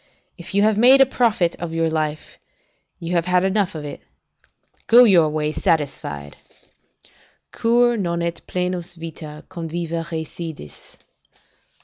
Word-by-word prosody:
If 175 +2 -9
you 200 - +4
have 215 -1 +2
made 255 +4 +7
your 270 - +7
profit 220 -9 +1
of 170 -1 -5
life, 160 -2 -2 0.6
you 170 +1 -5
have 170 -1 +1
had 180 0 +2
enough 195 -2 0
of 150 -1 -6
it; 145 - -8 0.9
go 240 +2 +8
your 175 -9 +5
way 150 0 -1
satisfied. 140 - -2 1.1
"Cur 240 +1 +2
non 170 -4 -2
ut 170 0 -3
plenus 180 -1 -3
vita; 155 -2 -9
conviva 165 0 -4
recedis?" 160 - -8
170 Hz, 125 wpm, -21 LUFS, 160-195 Hz, 1.1 s, go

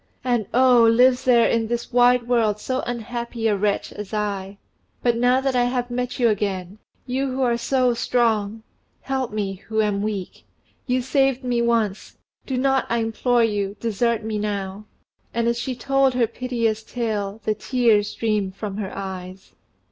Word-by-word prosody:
And, 240 -5 0
oh! 250 -1 +5
lives 250 +3 +4
there 240 -2 +5
in 230 -1 +1
this 235 +1 -4
wide 245 0 +4
world 225 -4 +2
so 255 +4 -2
unhappy 235 -1 -3
a 210 - +2
wretch 200 0 -1
as 210 +1 -6
I! 200 -2 -3 0.5
But 240 -1 +3
now 245 +2 +3
that 270 -1 0
I 245 -1 +3
have 245 0 -2
met 250 0 -3
you 240 - +3
again 200 -2 -2 0.3
you 265 +2 -1
who 260 0 -1
are 240 -2 +2
so 255 +1 +1
strong 225 -3 0 0.4
help 265 -3 -2
me 200 -2 -3
who 220 -1 -1
am 205 -2 +1
weak. 205 -3 -4 0.4
You 250 0 +1
saved 270 0 +1
me 245 -1 0
once 230 -4 -1 0.3
do 265 - -2
not, 270 0 +1
I 235 - +1
implore 235 +1 +1
you, 205 -3 -1
desert 230 0 0
me 215 -1 -3
now!!" 200 -1 -4 0.5
and 235 0 +1
as 235 0 0
she 260 0 -3
told 270 +1 +2
her 245 -2 +3
piteous 230 -2 -2
tale 220 -3 -3
the 215 - +1
tears 220 -2 +2
streamed 210 -4 -1
from 200 -1 -5
her 200 -3 -4
eyes. 190 -1 -7
230 Hz, 170 wpm, -23 LUFS, 210-250 Hz, 0.5 s, oh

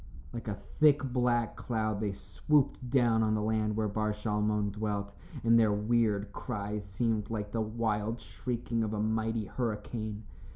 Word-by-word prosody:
Like 120 -1 -6
a 105 - -1
thick 145 +8 +3
black 120 -3 +2
cloud 110 -4 -1
they 105 -2 0
swooped 125 - 0
down 120 -4 +4
on 110 -1 +2
the 105 - 0
land 110 -1 +1
where 110 0 +1
Bar 105 +1 0
Shalmon 105 -1 0
dwelt, 100 -1 -3 0.3
and 115 0 +6
their 110 -2 +4
weird 105 -1 +1
cries 105 -3 -4
seemed 105 +2 -1
like 105 -2 -3
the 115 - 0
wild 110 0 -1
shrieking 120 -2 -3
of 110 0 -2
a - - -2
mighty 110 0 0
hurricane. 110 -1 -3
110 Hz, 160 wpm, -31 LUFS, 105-115 Hz, 0.3 s, and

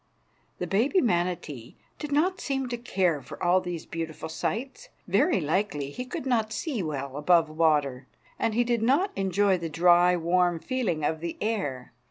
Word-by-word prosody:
The - - -3
baby 250 - +2
manatee 175 - -1 0.2
did 300 -2 -5
not 365 +7 +1
seem 270 -2 -2
to 240 - -2
care 185 -10 0
for - - -10
all 180 +1 +4
these 175 -3 -5
beautiful 160 -1 -5
sights. 265 - -4 0.2
Very 355 - +3
likely 150 -3 -1
he 250 - -6
could 250 - -6
not 225 -4 +1
see 255 - -2
well 140 -4 -4
above 165 +1 +3
water, 150 -5 +1 0.3
and 220 - 0
he 240 - +3
did 235 -1 0
not 280 - +2
enjoy 195 0 +2
the 165 -1 -4
dry, 175 +2 +5
warm 175 +1 +2
feeling 185 - -2
of 160 +1 -1
the 170 +1 -5
air. 165 - -3
180 Hz, 170 wpm, -27 LUFS, 160-240 Hz, 0.3 s, dry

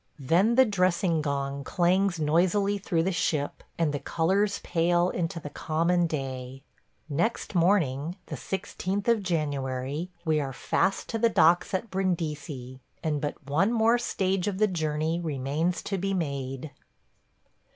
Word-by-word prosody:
Then 175 - +3
the 260 +1 +7
dressing 180 -5 +1
gong 140 -1 -2
clangs 180 +2 +2
noisily 185 +6 +2
through 170 -4 0
the 190 - 0
ship 150 -5 -1 0.2
and 160 -3 +1
the 145 - -1
colors 195 +8 +1
pale 175 +1 +2
into 170 -1 -2
the 145 -2 -8
common 170 +2 +1
day. 135 -3 -5 0.4
Next 170 +12 -1
morning, 170 -4 +2
the - - -6
16th 195 +1 -3
of 230 -2 +3
January, 145 -2 -2 0.2
we 155 -1 +2
are 135 -2 -4
fast 195 +8 0
to 225 - -2
the 230 +1 +4
docks 175 -3 +4
at 195 +4 -3
Brindisi, 155 -8 -3 0.2
and 150 -3 0
but 145 -1 -5
one 165 +10 +2
more 230 +1 +3
stage 190 -4 0
of 200 -2 -1
the 215 - +4
journey 160 -3 -1
remains 155 +2 -1
to 195 -2 -2
be 195 +1 -1
made. 140 -3 -3
170 Hz, 145 wpm, -27 LUFS, 145-190 Hz, 0.4 s, the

